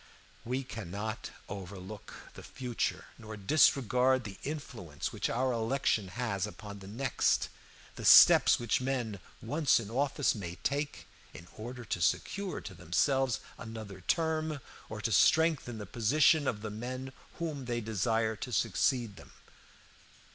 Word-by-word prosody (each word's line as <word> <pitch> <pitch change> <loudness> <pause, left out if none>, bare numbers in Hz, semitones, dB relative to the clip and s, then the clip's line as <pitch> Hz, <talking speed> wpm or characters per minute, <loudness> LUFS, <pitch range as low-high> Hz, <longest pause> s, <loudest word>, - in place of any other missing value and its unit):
We 125 +3 -2
cannot 110 -1 -5 0.2
overlook 100 +1 -8 0.2
the - - -10
future, 125 -3 -3
nor 110 -1 -8
disregard 130 +2 +3
the 100 -2 -8
influence 120 - -5
which - - -1
our 130 +3 +1
election 115 -3 0
has 100 -2 -2
upon 105 -1 -9
the 95 - -11
next; 120 +5 +1 0.5
the - - -6
steps - - +8
which 120 +1 0
men, 125 -6 -2 0.2
once 145 +4 +3
in 110 -2 -7
office, 140 +3 +1
may 90 -6 -6
take 145 +2 -2 0.3
in 85 - -11
order 120 +2 -7
to 90 - -3
secure 200 - -1
to 100 - -8
themselves 120 - +1 0.2
another 110 -4 -8
term, 155 - 0 0.3
or - - -6
to - - -1
strengthen 155 -6 +3
the 105 - -6
position 135 - +3
of 105 -3 -2
the 110 - -4
men 130 +4 -6 0.2
whom 155 -6 -4
they 120 -1 -1
desire 110 +1 0
to 125 - -6
succeed 110 +1 +1
them. - - -14
115 Hz, 140 wpm, -31 LUFS, 105-135 Hz, 0.5 s, steps